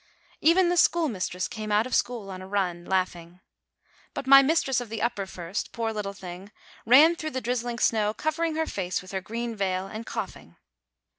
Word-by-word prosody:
Even 345 +3 +4
the 355 - +1
schoolmistress 220 - +1
came 215 -1 -6
out 210 +2 +3
of 255 - -6
school 230 -5 -1
on 185 0 -7
a 185 - -9
run, 180 -3 -1
laughing; 180 -2 -2 0.8
but - - -4
my 275 +1 +9
mistress 270 -3 +1
of 240 - -8
the 225 0 -4
upper 200 -4 -1
first, 175 +1 -5
poor 225 -2 -2
little 210 -2 -3
thing! 185 +1 -9 0.4
ran 300 +8 +7
through 310 -2 -4
the 260 - -3
drizzling 245 0 -2
snow, 215 -3 +2
cover 310 +8 -2
ing 325 -2 0
her 320 0 0
face 185 - -3
with 185 - -11
her 190 -1 -3
green 230 +3 -4
veil, 190 -2 -1
and 215 +4 -8
coughing. 195 - -6
220 Hz, 195 wpm, -26 LUFS, 190-260 Hz, 0.8 s, my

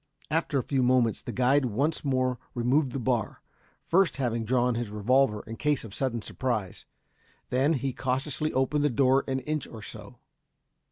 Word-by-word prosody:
After 160 -2 +1
a 130 - 0
few 135 -2 0
moments 125 -3 +2
the - - -6
guide 130 +2 +3
once 140 +8 -1
more 130 -3 0 0.2
removed 130 +3 +2
the - - -3
bar, 120 -3 -1 0.4
first 185 -1 +3
having 120 -4 -1
drawn 125 +1 +2
his 115 -2 -3
revolver 105 +2 +2
in 115 0 -7
case 150 -2 0
of 110 -4 -9
sudden 120 -3 -2
surprise. 110 -9 -3 0.6
Then 135 +5 +3
he 135 -2 -2
cautiously 135 +5 -1
opened 140 +3 +1
the 150 - +3
door 135 +2 +3
an 130 -1 -1
inch 150 +1 -3
or 110 -2 -10
so. - - -10
130 Hz, 170 wpm, -28 LUFS, 120-140 Hz, 0.6 s, guide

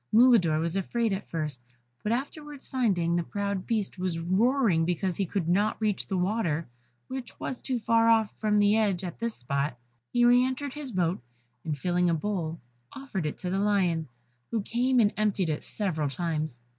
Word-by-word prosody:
Mulidor 220 -10 +5
was 165 +2 -1
afraid 220 +3 0
at 195 +1 -5
first, 150 -6 -3 0.4
but 210 - -1
afterwards 290 +3 -4
finding 190 -10 +1
that 175 - +2
the - - -10
proud 200 -2 -2
beast 215 -5 -1
was 180 -2 -1
roaring 190 +1 +2
because 175 +1 0
he 195 +1 -1
could 170 -2 -2
not 205 +5 +2
reach 215 -3 -1
the 190 - -1
water, 180 -4 0 0.4
which 260 -1 -7
was 260 - -4
too 255 - -1
far 230 0 +3
off 220 -2 +3
from 210 -1 +2
the 205 0 +4
edge 205 -5 +1
at 175 -2 -6
this 230 -1 -2
spot, 140 +1 -2 0.3
he 240 0 +4
re 245 +1 +6
entered 260 +1 -2
his 295 -4 -6
boat, 180 - 0 0.4
and 155 -2 -2
filling 180 +3 +1
a 165 - +2
bowl 165 -2 -2 0.3
offered 205 - -4
it - - -4
to 180 - -4
the 190 - 0
lion, 185 -6 +1 0.4
who 225 -3 -1
came 250 +4 +2
and 210 -3 +4
emptied 205 -5 +1
it 150 - -2
several 160 -8 -1
times. 155 -4 -3
195 Hz, 190 wpm, -28 LUFS, 170-230 Hz, 0.4 s, re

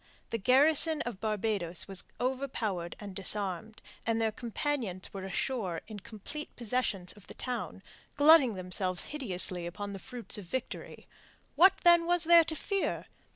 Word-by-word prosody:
The 230 - -1
garrison 295 - +4
of 235 -5 -6
Barbados 210 -5 -2
was 195 -1 -3
overpowered 245 -9 -2
and 200 -3 -8
disarmed, 200 +2 -2 0.2
and 230 0 0
their 225 -1 +1
companions 230 -4 -3
were 195 -1 -5
ashore 190 -3 -2
in 215 -2 -7
complete 230 +9 -8
possession 235 -5 -1
of 205 - -16
the - - -11
town, 245 -6 -4 0.3
glutting 290 -6 +6
themselves 185 0 -1
hideously 185 -10 -1
upon 200 +3 -6
the 195 - -6
fruits 245 -1 -5
of 200 - -9
victory. 255 +8 -5 0.5
What, 380 +2 +6
then, 345 -1 +6
was 350 0 +4
there 335 0 +8
to 315 - -2
fear? 395 +4 -2
220 Hz, 150 wpm, -31 LUFS, 190-275 Hz, 0.5 s, there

